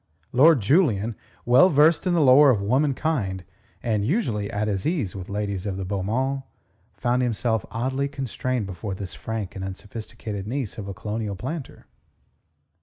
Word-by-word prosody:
Lord 140 +1 +6
Julian, 115 - +2 0.3
well 125 +10 +6
versed 155 +4 +4
in 175 - +2
the 165 - +3
lore 140 +1 +7
of 120 -6 +3
womankind 125 - 0 0.4
and 110 -3 0
usually 110 - 0
at 105 +1 -1
his 100 +1 -1
ease 145 - -1
with 95 -2 -7
ladies 100 -1 -3
of 95 -1 -3
the 95 - -4
beau 100 +1 -2
monde, 130 +7 -1 0.5
found 125 +1 +1
himself 115 -2 0
oddly 130 +4 -1
constrained 130 -3 -3
before 95 +1 -5
this 95 -4 -6
frank 105 +8 -5
and 95 - -5
unsophisticated 100 +1 -6
niece 125 -3 -3
of 100 - -6
a 100 - -4
colonial 110 -1 -3
planter. 135 - -6
110 Hz, 160 wpm, -24 LUFS, 100-135 Hz, 0.5 s, lore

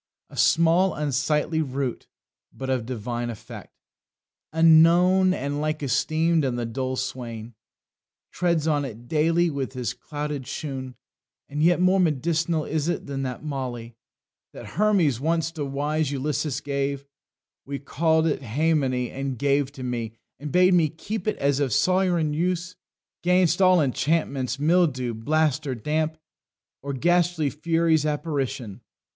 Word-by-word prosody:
"A - - -11
small 170 +3 +3
unsightly 150 +2 0
root, 135 -3 -3 0.4
But 130 0 -5
of 125 -3 -1
divine 120 0 -3
effect. 115 -4 -10 0.7
Unknown, 170 +4 +5
and 145 -3 -2
like 155 0 -2
esteem'd, 160 +4 +1
and 130 -3 -1
the 120 - -2
dull 130 +3 -3
swain 120 -3 -5 0.8
Treads 170 -3 0
on 145 -2 +1
it 120 -2 -8
daily 165 +4 +2
with 135 -2 -4
his 125 -3 -3
clouted 145 -3 -5
shoon; 130 -4 -5 0.5
And 145 +1 -4
yet 175 +2 +4
more 185 +1 +4
med'cinal 160 0 +1
is 155 0 -1
it 175 - -2
than 140 -1 -4
that 130 0 -4
moly 125 -5 -5 0.6
That - - -9
Hermes 185 - +3
once 165 +2 0
to 155 -3 -4
wise 145 +2 -1
Ulysses 140 0 -2
gave; 140 0 -2 0.6
He 140 - -2
call'd 160 +3 +1
it 155 -2 0
haemony, 130 -1 0
and 135 -1 -4
gave 140 +2 +2
it 140 -2 -10
me, 120 -3 -3 0.3
And 145 +1 -6
bade 180 +1 +5
me 165 -4 +4
keep 195 +6 -6
it 215 - 0
as 140 0 +1
of 140 -3 0
sovran 175 0 +2
use 180 +2 -1 0.5
'Gainst 180 0 +3
all 185 -1 +6
enchantments, 140 -2 0
mildew, 145 -6 +2
blast, 150 +5 0
or 130 - -2
damp, 155 +6 -1 0.6
Or 140 - -4
ghastly 170 0 +1
furies' 165 0 +1
apparition. 140 - -3
150 Hz, 140 wpm, -25 LUFS, 130-165 Hz, 0.8 s, all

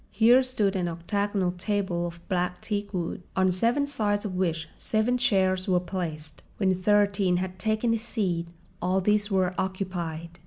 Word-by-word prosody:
Here 235 +5 +5
stood 215 -6 0
an 180 -2 0
octagonal 190 +2 -1
table 180 -2 -1
of 170 0 -11
black 180 -1 -1
teakwood, 200 -5 -3
on 185 -1 +3
seven 235 +10 +1
sides 210 -7 -1
of 195 - -3
which 165 -3 -1
seven 220 +3 +1
chairs 190 -6 +2
were 180 -2 +3
placed. 165 -4 -5 0.2
When 190 -2 +2
Thirteen 200 -1 +2
had 185 0 -4
taken 220 +3 +1
his 230 -1 0
seat 185 -8 -1 0.3
all 185 +2 +2
these 210 +2 +2
were 190 -2 +1
occupied. 175 -3 -4
190 Hz, 155 wpm, -27 LUFS, 180-210 Hz, 0.3 s, Here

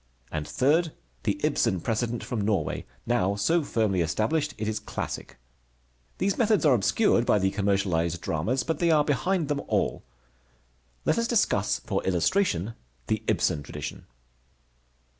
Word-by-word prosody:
And 75 -1 -3
third, 155 +5 +2 0.3
the - - 0
Ibsen 95 - +1
precedent 115 +4 -2
from 120 -4 -3
Norway, 100 -6 -1 0.2
now 105 -5 +1
so 165 +13 +2
firmly 110 -8 +1
established 135 - 0
it 105 0 -3
is 110 0 -1
classic. - - -6 0.8
These 195 0 0
methods 215 -6 +3
are 145 - +6
obscured 120 - +3
by 110 - +3
the 95 -1 +1
commercialized 95 -5 0
dramas, 115 +15 -1
but 160 -3 -2
they 170 - +2
are 155 -2 +5
behind 160 +4 0
them 140 -1 -1
all. - - 0 1.0
Let - - +2
us 230 - 0
discuss 215 - +1
for - - -1
illustration 95 - +1 0.3
the - - -1
Ibsen 75 - +1
tradition. - - -7
115 Hz, 140 wpm, -27 LUFS, 95-160 Hz, 1.0 s, are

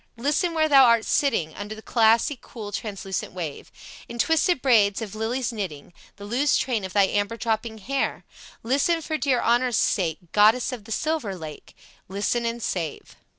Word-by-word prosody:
Listen 300 +7 0
where 315 -1 +3
thou 275 -3 +7
art 235 -2 +4
sitting 225 - +1
Under 210 +1 -7
the 220 - -12
glassy, 230 +5 +3
cool, 215 -4 -9
translucent 195 -3 -4
wave 165 -6 -6 0.4
In 235 - -7
twisted 325 +4 +2
braids 215 -7 +3
of 215 -3 -6
lilies 235 +3 -2
knitting 175 -8 -6 0.2
The 200 - -10
loose 255 +7 +2
train 235 -6 -1
of 190 -1 -6
thy 200 - +5
amber 205 +3 -1
dropping 225 -1 -2
hair; 265 +7 -2 0.4
Listen 285 +7 +1
for 310 0 -3
dear 260 -4 +1
honor's 240 0 +2
sake, 165 -6 +1
Goddess 220 +5 +4
of 235 -5 -7
the 225 - -11
silver 300 -6 -1
lake! 155 -4 -10 0.3
Listen 210 +5 -1
and 230 0 -4
save." 165 -5 -4
225 Hz, 170 wpm, -24 LUFS, 205-260 Hz, 0.4 s, thou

